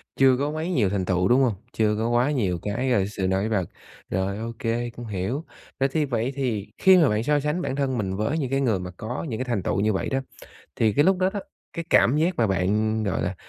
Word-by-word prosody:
chưa 130 -1 +5
có 145 +2 -1
quá 155 +1 -3
nhiều 125 - +1
thành 95 -1 -1
tựu, 90 0 +1
đúng 125 +2 +4
hông? 125 -5 +3 0.2
Chưa 105 -1 +1
có 115 +2 0
quá 120 +5 +2
nhiều 95 - 0
cái, 120 +6 -1
a, 100 -6 +3
sự 95 -3 -2
nổi 95 +3 0
bật. 95 -5 0 0.4
Rồi, 95 +2 -1
ô 115 +1 -4
kê, 120 +1 -1
cũng 120 0 -9
hiểu. 105 - -3 0.4
Rồi, 135 - +3
thì 155 -2 +2
vậy 120 0 -1
thì 115 -7 -2
khi 190 -1 +6
mà 160 -6 +5
bạn 105 +1 0
so 145 +3 +2
sánh 150 +5 -1
bản 135 - -2
thân 135 -2 -1
mình 95 -3 -2
với 110 +10 -1
những 135 -5 -2
cái 135 0 0
người 115 -8 +1
mà 90 0 -6
có 120 +7 -4
những 110 -2 -4
cái 130 - -2
thành 115 -7 -1
tựu - - 0
như 105 +1 +2
vậy 95 - -2
đó, 135 - 0 0.6
thì 110 -3 +2
cái 145 - +4
lúc 190 0 +4
đó 185 +1 +2
đó, 205 - -2 0.3
cái 170 - -5
cảm 130 +5 +4
giác 170 +4 +1
mà 115 - +3
bạn, 105 +4 +1
gọi 95 -2 -1
là, 90 +2 -2
115 Hz, 260 wpm, -24 LUFS, 100-135 Hz, 0.6 s, khi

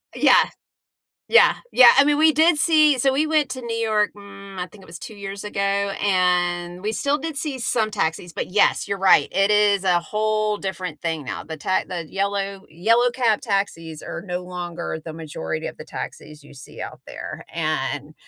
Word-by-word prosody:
Yeah. - - +5 0.9
Yeah. - - +6 0.2
Yeah, 250 -1 +9
I 275 - +7
mean, 295 0 +2
we 315 +1 +5
did 315 +2 +4
see 305 -3 +4
so 270 +2 +2
we 295 +4 +1
went 305 -3 +1
to 255 0 -5
New 230 -1 -4
York, 215 -2 +1
mm, 200 -1 -12
I 180 - -3
think 200 +1 -17
it 185 - -15
was 165 - -8
2 - - -9
years 200 -1 -7
ago, 210 -1 -5
and 180 -3 0
we 215 +2 -2
still 280 +5 0
did 320 -1 -5
see 275 -2 -3
some 225 -2 0
taxis, 175 -3 -2
but, - - -4
yes, 200 +2 +2
you're 200 - -2
right, 190 -6 +5
it 195 +1 +3
is 205 -2 +3
a 180 -2 +3
whole 215 +3 -1
different 185 -5 -5
thing 160 -4 -3
now. - - -5
The 160 -1 -8
ta 185 +5 0
the 170 -3 -6
yellow 200 0 -2
yellow 230 +9 +2
cab 235 -3 +1
taxis 195 - -3
are - - -6
no 180 -2 -3
longer 175 -2 -5
the 160 - -7
majority 150 - -5
of - - -8
the - - -10
taxis 150 0 -8
you - - -15
see 135 - -13
out - - -8
there, - - -8
and - - -2
200 Hz, 195 wpm, -22 LUFS, 175-230 Hz, 0.9 s, Yeah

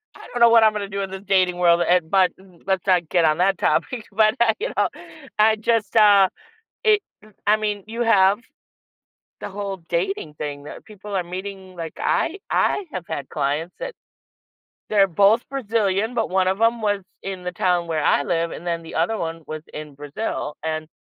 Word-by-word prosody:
I - - -12
don't 245 - -2
know 235 - +8
what 230 -1 +6
I'm 215 -1 +5
gonna 200 -2 -4
do 200 0 -3
in 195 - -4
this 190 +1 -7
dating 185 -2 +2
world, 175 -1 +4
eh, 180 +1 +5
but 190 -2 +4
m 185 -3 -19
let's 190 -2 0
not 175 -4 +2
get 175 -2 +3
on 155 0 +3
that 190 0 +3
topic, 240 -4 0
but 215 +1 +3
I 225 -2 +4
you - - -2
know, - - +3 0.5
I 220 +1 +5
just, 225 0 0
uh, 205 -3 +6 0.6
it 425 -1 +5 0.5
I 210 +1 +5
mean, 210 -2 -2
you 230 +2 -3
have 200 -3 +4 1.0
the - - -6
whole 200 -1 -5
dating 170 -3 -2
thing 145 -1 -6
that 150 - -10
people 210 -1 -9
are 185 -2 0
meeting, 190 +1 -7
like, 165 -2 -6
I 350 +5 0
I 405 - +1
have 185 -2 -5
had 145 -4 -5
clients 150 +4 -2
that - - -4 1.0
they're 200 -2 +4
both 200 +6 +4
Brazilian, 225 -4 0
but 225 -5 0
one 185 0 +2
of 190 +3 0
them 230 0 +2
was 205 -2 0 0.2
in 190 -2 -6
the 180 - -3
town 175 -1 0
where 160 -2 -1
I 145 - +3
live, 165 +1 -1
and 175 - -8
then 170 -1 -2
the 165 - -9
other 175 +8 +1
one 165 -2 -4
was 155 0 -5
in 150 -2 -8
Brazil, 145 +1 -4
and 155 -1 -3
190 Hz, 200 wpm, -22 LUFS, 170-215 Hz, 1.0 s, know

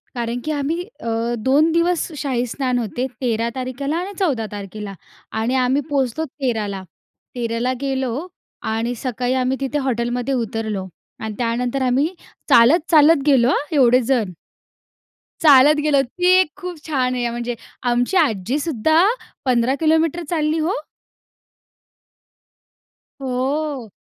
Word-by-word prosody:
कारण 240 0 -2
की 310 - -1
आम्ही 300 +3 -1 0.2
अ, 230 +1 -2
2 275 +8 +3
दिवस 335 +1 +1
शाहीस्नान 255 -1 -1
होते. 240 +3 -2
13 230 -2 0
तारखेला 265 +4 -3
आणि 370 +4 -4
14 275 - 0
तारखेला 205 0 -7 0.5
आणि 235 +4 0
आम्ही 260 +3 +2
पोहोचलो 280 +1 0
13 250 -7 -2
ला. 195 -1 -5 0.5
13 230 -1 -2
ला 250 +2 0
गेलो 265 -3 -1 0.6
आणि 230 +2 -1
सकाळी 250 0 -2
आम्ही 260 +1 0
तिथे 275 +2 -1
हॉटेलमध्ये 245 +1 -1
उतरलो 220 -5 -2 0.3
आणि 220 -1 -4
त्यानंतर 245 +3 -1
आम्ही 265 +7 +1 0.4
चालत, 240 +9 +6
चालत 305 -2 +6
गेलो 260 -4 +5
हां, 285 - +1
एवढे 250 -1 +5
जण. 235 -5 0 1.1
चालत 295 -1 +7
गेलो 285 -2 +4
ती 355 +8 -3
एक 370 - +1
खूप 360 -3 -6
छान 255 -5 0
आहे, 245 -1 -1
म्हणजे 240 +1 -3 0.4
आमची 245 +9 +1
आजी 250 - +1
सुद्धा 315 +2 +2 0.4
15 250 0 +2
किलोमीटर 320 +1 +2
चालली 315 -1 0
हो. 325 +5 0 2.5
हो. 265 -1 -2
255 Hz, 130 wpm, -20 LUFS, 235-295 Hz, 2.5 s, चालत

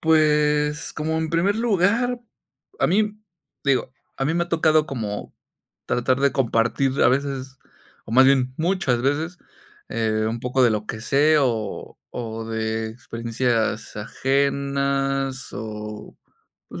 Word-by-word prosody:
Pues, 150 -1 +2
como 160 +1 -2
en 160 -1 -2
primer 180 +5 +2
lugar, 230 +3 +1 0.6
a - - +3
mí, 210 +3 +1 0.5
digo, 135 -2 +1 0.2
a 135 - -1
mí 160 +4 +1
me 175 - +1
ha - - -16
tocado 155 -2 +3
como 110 -7 -5 0.5
tratar 130 +2 +1
de 140 0 +3
compartir 130 +2 +1
a - - +6
veces, 135 -1 -2 0.5
o - - -8
más 130 +2 +7
bien, 130 -2 +3
muchas 160 -8 +1
veces, 155 +6 -1 0.5
eh, 110 -1 0
un 115 +1 -3
poco 125 +2 +1
de 120 - +5
lo 105 -1 -2
que 110 - -5
sé, 145 +7 +3
o 115 -5 -2 0.2
o 115 -1 -5
de 110 0 -2
experiencias 115 -1 -2
ajenas, 135 +2 0
o, 105 0 -7 0.5
pues, - - -8
135 Hz, 135 wpm, -23 LUFS, 115-155 Hz, 0.6 s, más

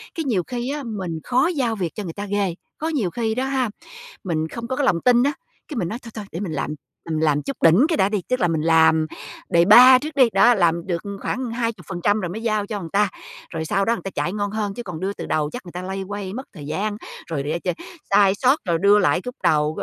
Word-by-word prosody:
Cái 325 - -2
nhiều 210 -9 +1
khi 245 0 -3
á, 295 0 -4
mình 190 -9 -4
khó 255 +5 +2
giao 265 -10 0
việc 180 -6 -3
cho 210 - -4
người 170 -4 -6
ta 205 +3 -5
ghê. 200 -3 -1 0.2
Có 315 - -3
nhiều 260 - 0
khi 220 0 -1
đó 255 +2 -1
ha, 265 -3 0 0.5
mình 160 -4 -1
không 230 +7 -7
có 260 - -2
cái 280 - 0
lòng 170 -10 +2
tin 245 -1 +4
á, 285 +2 +1 0.3
cái 295 - -6
mình 185 -7 -1
nói: 225 +6 -5
"Thôi, 230 - -10
thôi, 215 -2 -6
để 170 - -5
mình 185 -5 -4
làm", 150 - -2
là - - -4 0.4
mình 155 0 0
làm 150 -2 +2
chút 275 - -5
đỉnh 170 - +6
cái 325 -2 0
đã 190 - +3
đi, 205 -2 -1
tức 255 0 +1
là 175 - +3
mình 160 -2 0
làm 160 -1 +4 0.4
đề-pa 240 +10 +8
trước 300 +2 -6
đi, 260 -4 +5
đó, 195 +5 +6
làm 170 -3 +1
được 170 -3 -1 0.2
khoảng 255 -2 -3
20% 215 -4 -1
rồi 180 - -3
mới 210 +6 -6
giao 215 -3 0
cho 210 -1 -4
người 170 -4 -7
ta, 205 +3 +2 0.4
rồi 160 -1 -4
sau 195 +5 +1
đó 230 - +2
người - - -5
ta 195 - -4
chạy 175 - -2
ngon 205 -1 -2
hơn 210 -2 -2
chứ 240 - -6
còn 180 -7 -7
đưa 195 +3 -2
từ - - -7
đầu 150 -1 0
chắc 245 - -7
người 175 - -10
ta 180 - -6
loay 190 +1 -4
hoay 195 0 -5
mất 260 +4 -6
thời 150 -7 -9
gian, 205 +7 -2 0.3
rồi 150 -4 -3
để 155 +4 -2
ch - - -9 0.4
sai 200 -1 +5
sót, 260 +7 +3
rồi 170 -2 +1
đưa 200 +1 +6
lại 175 -3 +2
cúc 250 +5 -7
đầu 150 0 +2
200 Hz, 270 wpm, -22 LUFS, 170-240 Hz, 0.5 s, đề-pa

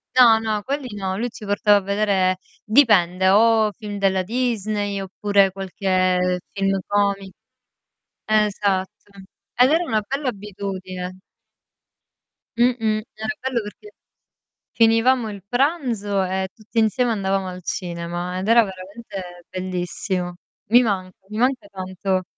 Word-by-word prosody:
No, 235 -3 +7
no, 215 -2 -2
quelli 265 -4 -4
no, 190 -1 -3
lui 240 +2 -2
ci 215 - -11
portava 205 +1 +4
a 200 - 0
vedere 195 -2 +1 0.3
dipende 190 -7 +4
o 220 +1 +4
film 205 -1 -7
della 190 -1 +2
Disney, 215 -3 -1
oppure 195 0 +2
qualche 185 -1 0
film 195 -1 0
comi 200 -1 0 0.9
esatto 205 -3 +1 0.6
ed 250 +3 +5
era 335 +3 +3
una 220 -8 0
bella 275 0 -2
abitudine. 190 -3 -6 1.4
Mh-mh. 225 -3 +2
Era 220 0 -5
bello 260 -2 -1
perché 215 - -11 0.8
finivamo 230 +1 +3
il 200 -2 -8
pranzo 245 - 0
e 190 +1 -2
tutti 220 +1 -12
insieme 235 +3 +2
andavamo 195 -2 -1
al 180 0 -8
cinema, 175 +1 -4
ed 190 +3 -2
era 230 -1 +6
veramente 185 -2 -9
bellissimo. 180 0 -3 0.4
Mi 245 +2 +8
manca, 185 -5 -2
mi 215 - -6
manca 260 +5 +1
tanto 185 0 -2
200 Hz, 125 wpm, -22 LUFS, 185-225 Hz, 1.4 s, Mi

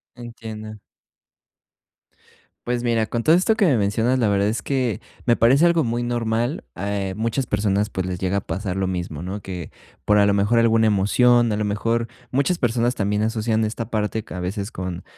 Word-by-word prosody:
Entiendo. 110 -3 -9 1.9
Pues, 120 -1 0
mira, 115 -2 +1
con 115 +1 -2
todo 160 - +5
esto 205 +5 +3
que 205 - +3
me 150 -7 +4
mencionas, 110 +5 +1
la 110 -4 +2
verdad 100 0 +2
es 110 -1 -1
que 130 -5 -1 0.2
me 120 -1 +4
parece 135 +8 +4
algo 170 -2 +3
muy 120 -1 -1
normal, 120 +3 -1
eh, 100 -1 -2
muchas 115 +4 -1
personas, 105 -1 0
pues, 95 -2 -3
les 90 -1 -4
llega 95 +1 0
a - - -1
pasar 95 -1 -4
lo 95 -1 0
mismo, 90 -5 -4
¿no?, 95 +3 -5
que 90 -4 -7 0.4
por, 105 0 +4
a 100 - +5
lo 100 - +3
mejor, 105 +4 +2
alguna 115 -1 +4
emoción, 120 +4 +3
a 105 - -1
lo 105 - -1
mejor 115 +3 -1 0.2
muchas 140 +7 +1
personas 120 0 +1
también 105 +1 0
asocian 110 0 0
esta 110 +1 -4
parte 110 -1 -1
que - - -11
a 90 - -5
veces 100 +4 -4
con 90 -1 -5
110 Hz, 195 wpm, -22 LUFS, 100-120 Hz, 1.9 s, todo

